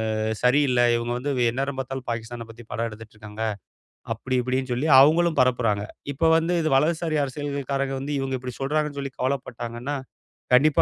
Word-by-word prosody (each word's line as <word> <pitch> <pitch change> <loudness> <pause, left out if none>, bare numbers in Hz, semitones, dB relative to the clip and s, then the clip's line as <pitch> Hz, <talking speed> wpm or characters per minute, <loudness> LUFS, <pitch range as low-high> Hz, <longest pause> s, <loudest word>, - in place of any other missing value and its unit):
அ - - -2 0.3
சரி 130 +4 +5
இல்ல. 125 - +2 0.2
இவங்க 120 +1 -2
வந்து 140 +3 -2 0.2
எந்நேரம் 135 +2 -2
பார்த்தாலும் 135 -1 -5
பாகிஸ்தானப் 115 0 -6
பத்தி 115 +1 -14
படம் 115 +1 -1
எடுத்துட்டு 110 0 -12
இருக்காங்க. 105 +1 -7 0.7
அப்படி 130 0 -2
இப்படின்னு 130 0 -1
சொல்லி 140 +6 0
அவங்களும் 165 +3 +4
பரப்புறாங்க. 115 -5 +1 0.3
இப்போ 160 +4 +2
வந்து 165 +2 +1
இது 155 - 0
வலதுசாரி 160 +2 +1
அரசியல் 140 0 -5
காரங்க 135 0 -1
வந்து 145 +2 -3
இவங்க 135 -1 -2
இப்படி 125 -1 -6
சொல்றாங்கன்னு 150 0 -1
சொல்லிக் 135 -1 -7
கவலைப்பட்டாங்கன்னா. 125 0 -3 0.6
கண்டிப்பா 145 +3 +5
130 Hz, 165 wpm, -24 LUFS, 120-145 Hz, 0.7 s, சரி